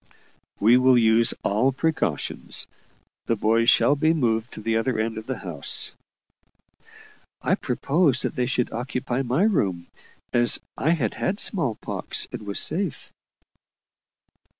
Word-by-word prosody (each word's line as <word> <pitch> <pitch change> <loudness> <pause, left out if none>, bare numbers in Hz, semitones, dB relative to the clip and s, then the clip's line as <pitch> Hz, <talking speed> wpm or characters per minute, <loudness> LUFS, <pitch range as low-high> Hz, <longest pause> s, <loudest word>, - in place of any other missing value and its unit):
"We 115 +4 +5
will 130 0 +5
use 115 0 +4
all 110 +7 +2
precautions. 135 - -1 0.6
The 115 - +2
boys 115 +2 +2
shall 140 +2 +4
be 155 +3 +2
moved 115 -5 0
to - - -7
the 110 +1 -1
other 115 +1 -1
end 110 0 -2
of 110 - -12
the 130 -2 -3
house." 85 -7 -3 1.5
I - - 0
proposed 140 -4 +1
that - - -3
they 125 -3 0
should 125 -2 -1
occupy 125 +1 -3
my 135 +7 0
room, 95 - 0 0.5
as 120 0 +4 0.2
I 155 - -1
had 115 -8 -1
had 200 +2 -2
smallpox, 140 - -2
and 105 - -8
was 100 - -1
safe. 175 0 -1
120 Hz, 135 wpm, -24 LUFS, 110-140 Hz, 1.5 s, We